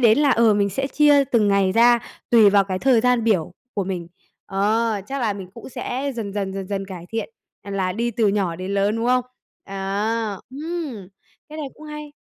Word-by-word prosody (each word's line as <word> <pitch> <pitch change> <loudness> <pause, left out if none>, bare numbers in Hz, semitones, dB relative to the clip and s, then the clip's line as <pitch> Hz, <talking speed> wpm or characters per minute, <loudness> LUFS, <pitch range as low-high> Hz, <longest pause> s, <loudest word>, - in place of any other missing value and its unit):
đến 230 +1 +5
là, 290 -2 +4
ờ, 230 -3 +4
mình 200 -1 +2
sẽ 270 +8 -2
chia 290 0 +4
từng 230 -5 +2
ngày 200 -1 +3
ra 235 +2 +5 0.3
tùy 220 -4 +7
vào 200 0 +4
cái 185 -1 -3
thời 255 +1 +4
gian 245 -1 +2
biểu 180 -7 +1 0.2
của 200 - -1
mình. 180 -3 -4 0.4
Ờ. 210 +2 +1
Chắc 275 0 -4
là 225 -4 +1
mình 195 -2 -8
cũng 230 - -10
sẽ 265 +2 -3
dần 215 -4 -4
dần, 195 -2 -2
dần 195 -1 -4
dần 195 0 -3
cải 180 -3 -9
thiện, 225 - -3 0.3
à, 200 - -9
là 190 -2 -1
đi 235 +5 -1
từ 225 -1 +1
nhỏ 195 -5 0
đến 185 +2 -4
lớn, 200 +2 +1
đúng 230 +1 -1
không? 250 0 +3 0.4
À! 200 +2 -2
Ừm, 290 - -5 0.4
cái 305 +1 -9
này 300 - -3
cũng 310 - -14
hay. 300 -1 -8
220 Hz, 215 wpm, -22 LUFS, 195-250 Hz, 0.4 s, tùy